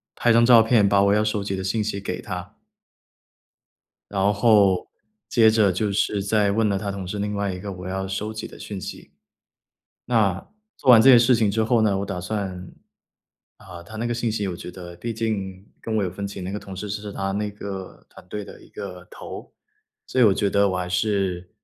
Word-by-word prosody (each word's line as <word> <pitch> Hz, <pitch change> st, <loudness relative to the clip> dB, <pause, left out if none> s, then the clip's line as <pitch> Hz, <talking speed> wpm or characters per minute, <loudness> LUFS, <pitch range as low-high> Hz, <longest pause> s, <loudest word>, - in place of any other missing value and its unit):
拍 120 Hz, -, +2 dB
张 115 Hz, +1 st, +5 dB
照 115 Hz, -2 st, +8 dB
片， 110 Hz, -3 st, +4 dB
把 100 Hz, 0 st, +4 dB
我 100 Hz, -, +4 dB
要 105 Hz, +1 st, +3 dB
收 105 Hz, -1 st, -1 dB
集 95 Hz, -1 st, -3 dB
的 95 Hz, -, -4 dB
信 105 Hz, +3 st, 0 dB
息 100 Hz, -1 st, -3 dB
给 90 Hz, -2 st, -5 dB
他。 90 Hz, +1 st, -7 dB, 1.5 s
然 100 Hz, +1 st, +2 dB
后， 100 Hz, -4 st, +4 dB, 0.4 s
接 110 Hz, -2 st, +5 dB
着 110 Hz, -3 st, +3 dB
就 100 Hz, +3 st, -1 dB
是 100 Hz, 0 st, 0 dB
在 105 Hz, 0 st, +2 dB
问 110 Hz, +1 st, +2 dB
了 100 Hz, -1 st, +1 dB
他 100 Hz, 0 st, -3 dB
同 95 Hz, -2 st, -6 dB
事 100 Hz, +3 st, -4 dB
另 105 Hz, 0 st, -2 dB
外 100 Hz, -2 st, -1 dB
一 90 Hz, -, -7 dB
个 100 Hz, +1 st, -6 dB
我 90 Hz, 0 st, -8 dB
要 95 Hz, +1 st, -3 dB
收 105 Hz, +3 st, -4 dB
集 110 Hz, -, -6 dB
的 -, -, -13 dB
讯 100 Hz, -3 st, -7 dB
息。 -, -, -9 dB, 0.9 s
那， 105 Hz, -6 st, +1 dB, 0.3 s
做 130 Hz, -, -1 dB
完 115 Hz, -2 st, +9 dB
这 135 Hz, -, +6 dB
些 125 Hz, -, +9 dB
事 120 Hz, +2 st, +5 dB
情 110 Hz, -3 st, +2 dB
之 110 Hz, +2 st, +1 dB
后 115 Hz, 0 st, +2 dB
呢， 100 Hz, -3 st, +2 dB
我 100 Hz, -, -3 dB
打 100 Hz, -3 st, -4 dB
算 95 Hz, -1 st, -4 dB, 0.9 s
啊， 90 Hz, -3 st, -11 dB
他 110 Hz, +6 st, -11 dB
那 115 Hz, +2 st, -2 dB
个 120 Hz, -, -1 dB
信 120 Hz, -1 st, -1 dB
息 105 Hz, -2 st, -2 dB
我 90 Hz, -, -3 dB
觉 90 Hz, -, -8 dB
得 90 Hz, -1 st, -10 dB
毕 115 Hz, +6 st, -4 dB
竟 100 Hz, -4 st, -3 dB
跟 110 Hz, -1 st, -3 dB
我 105 Hz, -, +1 dB
有 90 Hz, -, -2 dB
分 100 Hz, +3 st, -5 dB
歧 100 Hz, -1 st, -7 dB
那 95 Hz, +2 st, -5 dB
个 105 Hz, -, -3 dB
同 95 Hz, -2 st, -10 dB
事 100 Hz, +2 st, -5 dB
是 105 Hz, 0 st, -5 dB
他 95 Hz, -1 st, -3 dB
那 105 Hz, +1 st, -2 dB
个 100 Hz, -2 st, -8 dB
团 -, -, -16 dB
队 105 Hz, +2 st, -5 dB
的 -, -, -12 dB
一 -, -, -17 dB
个 90 Hz, -3 st, -8 dB
头， -, -, -9 dB, 0.6 s
所 130 Hz, -, -1 dB
以 120 Hz, -, +7 dB
我 105 Hz, -, +6 dB
觉 100 Hz, -, 0 dB
得 100 Hz, 0 st, +3 dB
我 95 Hz, -, -1 dB
还 90 Hz, -1 st, -2 dB
是 90 Hz, -1 st, -1 dB
100 Hz, 245 characters per minute, -23 LUFS, 95-110 Hz, 1.5 s, 完